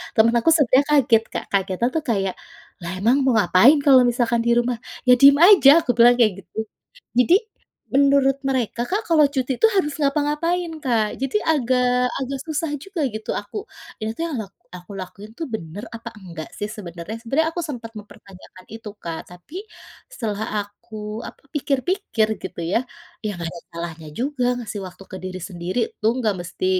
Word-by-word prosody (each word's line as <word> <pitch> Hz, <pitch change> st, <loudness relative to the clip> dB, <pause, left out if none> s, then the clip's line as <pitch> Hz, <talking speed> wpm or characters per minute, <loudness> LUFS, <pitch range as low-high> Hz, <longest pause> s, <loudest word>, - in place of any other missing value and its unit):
Teman 225 Hz, 0 st, +5 dB
aku 235 Hz, -, +2 dB
sebenarnya 280 Hz, -2 st, +4 dB
kaget 245 Hz, -6 st, +4 dB
Kak, -, -, -3 dB
kagetnya 195 Hz, +3 st, 0 dB
tuh 320 Hz, -, 0 dB
kayak, 195 Hz, -4 st, 0 dB, 0.5 s
"Lah 170 Hz, -, -5 dB
emang 235 Hz, +7 st, +3 dB
mau 260 Hz, -, +3 dB
ngapain 215 Hz, -, +6 dB
kalau 265 Hz, -3 st, +7 dB
misalkan 235 Hz, -1 st, +1 dB
di -, -, +4 dB
rumah?" 240 Hz, 0 st, +1 dB, 0.3 s
"Ya 250 Hz, -, +8 dB
diem 280 Hz, +1 st, +8 dB
aja," 330 Hz, -5 st, +7 dB
aku 245 Hz, -, +1 dB
bilang 240 Hz, +1 st, +7 dB
kayak 235 Hz, -3 st, +4 dB
gitu. 195 Hz, -, -18 dB, 0.6 s
Jadi, 335 Hz, +8 st, +5 dB, 0.6 s
menurut 275 Hz, 0 st, +4 dB
mereka 245 Hz, -3 st, -1 dB
Kak 420 Hz, +4 st, -1 dB
kalau 315 Hz, -3 st, +5 dB
cuti 265 Hz, -2 st, -2 dB
tuh 450 Hz, -, +6 dB
harus 300 Hz, -7 st, +1 dB
ngapa-ngapain 300 Hz, +5 st, 0 dB
Kak, 225 Hz, -5 st, +1 dB
jadi 270 Hz, +10 st, 0 dB
agak 250 Hz, -3 st, +2 dB
agak 270 Hz, 0 st, -4 dB
susah 315 Hz, 0 st, -2 dB
juga 390 Hz, -4 st, -5 dB
gitu 215 Hz, 0 st, -4 dB
aku, 205 Hz, -, -9 dB, 0.4 s
"Ini 220 Hz, 0 st, -2 dB
tuh 330 Hz, -, -2 dB
yang 305 Hz, -6 st, -4 dB
ak -, -, -33 dB, 0.2 s
aku 180 Hz, +2 st, -11 dB
lakuin 195 Hz, +3 st, -9 dB
tuh 325 Hz, -, -4 dB
bener 190 Hz, 0 st, -6 dB
apa 230 Hz, +1 st, -8 dB
enggak 170 Hz, -5 st, -8 dB
sih 205 Hz, -, -2 dB
sebenarnya?" 185 Hz, +3 st, -7 dB
Sebenarnya 280 Hz, +7 st, +1 dB
aku 345 Hz, -, -2 dB
sempat 245 Hz, -7 st, -6 dB
mempertanyakan 190 Hz, -2 st, -15 dB
itu 225 Hz, -1 st, -8 dB
Kak 165 Hz, -1 st, -6 dB
tapi 180 Hz, -, -14 dB, 0.6 s
setelah 215 Hz, -, -3 dB
aku, 215 Hz, +1 st, -8 dB
apa, -, -, -10 dB
pikir-pikir 285 Hz, -, 0 dB
gitu 190 Hz, -, -7 dB
ya, -, -, +4 dB, 0.4 s
ya 215 Hz, -, -1 dB
enggak 170 Hz, -1 st, -4 dB
ada 170 Hz, -, -9 dB
salahnya 165 Hz, -1 st, -7 dB
juga 265 Hz, 0 st, -1 dB
ngasih 215 Hz, -3 st, -6 dB
waktu 185 Hz, +2 st, -13 dB
ke 190 Hz, -, -6 dB
diri 185 Hz, 0 st, -5 dB
sendiri, 180 Hz, +4 st, -3 dB, 0.2 s
"lu 215 Hz, -, +2 dB
enggak 215 Hz, -5 st, 0 dB
mesti 175 Hz, +1 st, -5 dB
235 Hz, 175 wpm, -22 LUFS, 205-280 Hz, 0.6 s, Ya